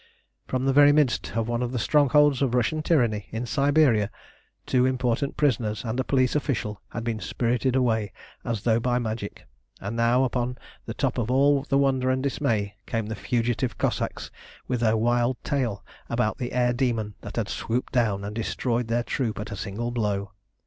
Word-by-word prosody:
From 130 0 -1
the 135 - +2
very 145 +1 +7
midst 145 -6 +1
of 115 -1 0
one 120 0 -1
of 125 -1 -1
the 130 - -2
strongholds 145 +2 +4
of 130 -3 +1
Russian 125 +6 +1
tyranny 120 - +1
in 115 +3 -4
Siberia, 135 -4 +3 0.6
two 125 -1 +2
important 130 +1 -1
prisoners 115 -7 0
and 115 +3 -2
a - - +2
police 130 -1 +1
official 115 -8 -2
had 115 - -5
been 115 -2 -2
spirited 125 +3 0
away 110 -6 +1 0.3
as 115 -5 -3
though 115 -1 +3
by 120 +1 +1
magic, 110 -3 -4 0.3
and 100 +4 -5
now 120 +2 +3
upon 125 -1 -1 0.3
the - - -5
top - - -1
of 115 -1 -2
all 140 +2 +3
the 135 - +3
wonder 130 -2 +2
and 130 0 0
dismay 115 -8 0
came 115 -2 -1
the 110 +1 -4
fugitive 120 +4 -1
Cossacks - - -2 0.4
with 125 -2 -1
their 115 -1 +2
wild 120 +2 +1
tale 120 -9 -2 0.2
about 105 - 0
the 125 -1 -3
air 125 -1 +2
demon 120 -4 -1
that - - -8
had - - -1
swooped 120 +4 -3
down 105 -6 +1
and 105 +1 -5
destroyed 115 +1 -1
their 120 +1 0
troop 115 -5 -2
at 105 - -6
a - - -4
single 105 +5 -4
blow. 100 -4 -1
120 Hz, 185 wpm, -25 LUFS, 110-130 Hz, 0.6 s, very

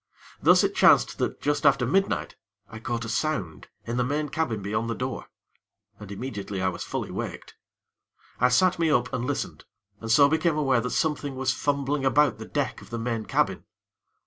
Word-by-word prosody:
Thus, - - +6
it - - +1
chanced - - +4
that - - -2
just 145 0 0
after 135 -2 +4
midnight, 195 +10 0 0.3
I 110 - -10
caught 115 0 -3
a - - -5
sound 110 - -2 0.2
in 115 +1 -3
the 125 - +2
main 145 +4 -1
cabin 135 -9 -2
beyond 110 +3 -2
the 115 - -2
door, 130 +1 -4 0.7
and 105 -1 -10
immediately 100 -3 -5
I 95 0 +1
was 90 - -6
fully - - -4
waked. - - -6 0.9
I 125 - +4
sat 175 +8 +3
me 165 -1 +2
up 125 -4 +1
and 125 -1 -2
listened, - - -4 0.4
and 115 - -7
so 140 +5 +6
became 160 +1 +1
aware 135 -5 +2
that 125 - -3
something 145 -3 -1
was 130 0 0
fumbling 140 0 -1
about 140 -1 +3
the - - -7
deck - - -2
of - - -14
the 120 - -4
main 115 -1 -3
cabin. 95 - 0
125 Hz, 190 wpm, -26 LUFS, 115-145 Hz, 0.9 s, Thus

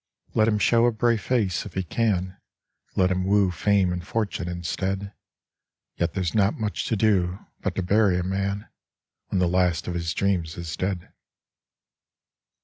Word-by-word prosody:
Let 110 - +3
him 110 -2 +2
show 115 +3 +4
a - - +3
brave 115 0 +1
face 100 -8 0
if 90 - -13
he 95 - 0
can; 95 -2 0 0.6
Let 90 0 +3
him 95 0 0
woo 100 -1 +3
fame 95 +1 +2
and 90 -1 -4
fortune 100 -2 -2
instead; 95 +3 -3 0.8
Yet 85 -1 -1
there's 90 -3 -1
not 105 +1 +2
much 105 -2 -2
to 115 - 0
do, 95 -4 +2 0.2
but 100 -3 -3
to 95 - -1
bury 100 0 +3
a 90 - -1
man 100 +2 -2 0.6
When - - -2
the 90 -1 +3
last 90 -2 +1
of 90 - -2
his 85 -1 -2
dreams 90 -5 0
is 85 -3 -5
dead. 95 -2 -3
95 Hz, 165 wpm, -25 LUFS, 90-105 Hz, 0.8 s, show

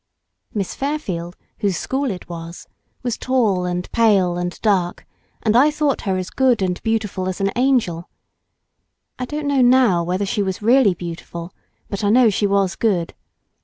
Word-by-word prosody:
Miss 200 -3 -3
Fairfield, 190 - -4 0.2
whose 200 -5 0
school 270 0 -1
it 185 -4 -6
was 170 0 -8 0.4
was 245 -2 -2
tall 220 -9 +1
and 180 0 -2
pale 200 -6 +3
and 175 0 -4
dark, 190 -5 +1 0.4
and 220 -1 +2
I 275 +5 +6
thought 300 -2 0
her 190 - +1
as 185 -1 -4
good 250 -6 +2
and 180 -1 -2
beautiful 215 -5 -1
as 185 - -5
an 195 0 +1
angel. 235 -10 +1 1.1
I 255 - -2
don't 300 +3 -4
know 280 -2 +2
now 245 -8 +4
whether 185 +4 -1
she 205 +2 -1
was 190 -2 -2
really 230 -3 +4
beautiful, 170 0 -7 0.3
but 200 0 -4
I 205 - +2
know 235 0 +5
she 205 +1 +1
was 195 -2 +1
good. 185 -7 0
200 Hz, 165 wpm, -20 LUFS, 180-245 Hz, 1.1 s, I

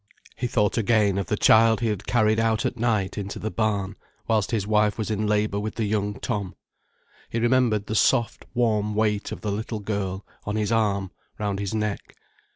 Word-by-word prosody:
He 125 +2 -2
thought 105 -1 +1
again 105 -3 +2
of 95 - -3
the 105 - 0
child 110 +1 +5
he 115 -2 0
had 100 -2 -4
carried 110 -2 +3
out 110 -1 +1
at - - -1
night 110 -5 0
into 100 0 -5
the 110 - -4
barn, 105 -3 -1 0.3
whilst 110 -3 +1
his 110 -5 -1
wife 105 0 +2
was 110 -1 -2
in 105 0 -1
labour 105 -1 +1
with 110 +1 -4
the 115 - -1
young 105 0 -1
Tom. 105 -6 -3 0.7
He - - -3
remembered 120 -3 +2
the 110 - -4
soft, 120 +2 +2
warm 105 -3 +1
weight 105 -1 0
of - - -6
the 105 -2 -2
little 110 +2 -3
girl 100 -2 -3 0.2
on 105 - -3
his 110 0 0
arm, 100 -4 +1 0.3
round 100 -2 -2
his 100 +1 -3
neck. 105 -2 -3
105 Hz, 195 wpm, -25 LUFS, 100-110 Hz, 0.7 s, child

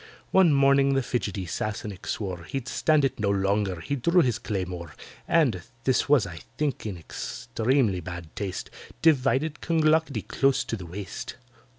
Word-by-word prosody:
One 190 -4 +6
morning 140 0 +4
the 135 - +2
fidgety 100 -6 -2
Sassenach 105 +2 -4
swore 90 -5 -3
He'd 130 +5 -4
stand 155 -3 +3
it 135 - -2
no 105 -1 +1
longer—he 100 - 0
drew 170 +8 +4
his 120 -2 0
claymore, 90 -8 -4 0.3
And 135 - +3 0.2
(this 130 +1 +2
was, 145 -6 +5
I 80 -2 -8 0.2
think, 145 -7 -1
in 100 -4 -4
extremely 110 - -1
bad 85 -2 -8
taste) 95 -3 -4 0.3
Divided 145 0 +3
CLONGLOCKETTY 160 - +2
close 135 +2 +2
to - - -3
the 95 -5 -8
waist. 95 +3 -6
115 Hz, 150 wpm, -26 LUFS, 95-140 Hz, 0.3 s, One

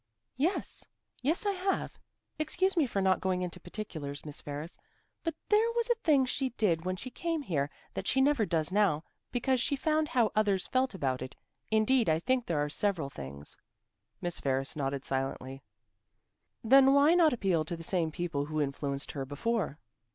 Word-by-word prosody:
"Yes 330 +9 0 0.4
yes, 315 - +1
I 405 - +3
have. 385 0 -2 0.4
Excuse 370 +5 +1
me 315 -6 +3
for 200 -4 -1
not 190 -1 +3
going 185 -1 0
into 180 - -5
particulars, 155 -8 -6
Miss 150 -1 -3
Ferris, 150 +3 -6 0.4
but 330 -2 -2
there 435 +2 +4
was 475 0 +2
a - - +4
thing 285 -5 +4
she 260 +1 -1
did 170 -6 +2
when 185 0 0
she 250 +7 -8
came 330 0 -2
here 145 - -1 0.2
that - - -4
she 265 - +2
never 275 -3 +4
does 165 -4 0
now, 190 -6 +2 0.3
because 255 +1 +1
she 280 - +1
found 310 +2 +1
how 240 -6 +2
others 200 -3 +2
felt 255 -3 0
about 130 -7 -1
it. 130 - -6 0.3
Indeed, 220 0 +3
I 155 - +4
think 250 +8 0
there 165 - 0
are - - -1
several 160 -3 -1
things." 70 - -8 0.7
Miss 175 -1 -1
Ferris 135 +2 -1
nodded 140 -2 -2
silently. 135 0 -3 1.0
"Then 270 +3 +7
why 290 +3 +6
not 340 -3 +5
appeal 190 -9 +1
to 170 +2 -3
the 165 - -8
same 170 -2 +1
people 160 -3 -2
who 155 +1 -3
influenced 140 -1 -2
her 140 - -4
before?" 150 - -2
190 Hz, 180 wpm, -31 LUFS, -, 1.0 s, Then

